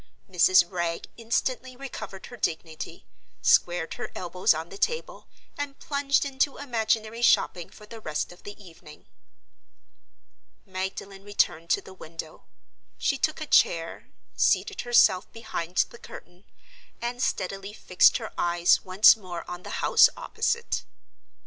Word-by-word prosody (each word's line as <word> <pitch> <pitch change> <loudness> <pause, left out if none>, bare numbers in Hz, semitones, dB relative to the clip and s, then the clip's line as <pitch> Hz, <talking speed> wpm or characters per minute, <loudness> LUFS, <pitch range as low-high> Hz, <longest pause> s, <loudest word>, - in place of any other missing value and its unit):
Mrs. 185 -1 +5
Wragge 170 -2 -2
instantly 250 +2 -2
recovered 220 -7 -8
her 245 - -10
dignity, 160 -6 -4 0.4
squared 175 -1 +3
her - - -6
elbows 180 0 +1
on 160 +2 -1
the 195 - -10
table, 480 +1 -2 0.3
and 285 -1 -4
plunged 280 -1 0
into 275 +1 0
imaginary 225 -3 -1
shopping 180 -7 +2
for 210 - -15
the 225 +2 -10
rest 155 -3 -3
of 175 - -15
the 205 +1 -10
evening. 165 -5 -15 1.6
Magdalen 190 +1 -6
returned 175 -5 0
to - - +2
the 190 - -12
window. 165 -3 -9 0.5
She 275 - 0
took 310 - 0
a - - -3
chair, 165 - +2 0.3
seated 415 - +1
herself 235 -6 +4
behind 180 -6 -6
the 235 - -13
curtain, 175 +2 -13 0.5
and 240 +1 -4
steadily 195 -1 -2
fixed 185 -3 +4
her - - -8
eyes 175 0 +3
once 190 +3 +7
more 185 -5 -8
on 175 0 -7
the - - -10 0.2
house - - +7
opposite. 470 0 -2
195 Hz, 135 wpm, -26 LUFS, 175-240 Hz, 1.6 s, once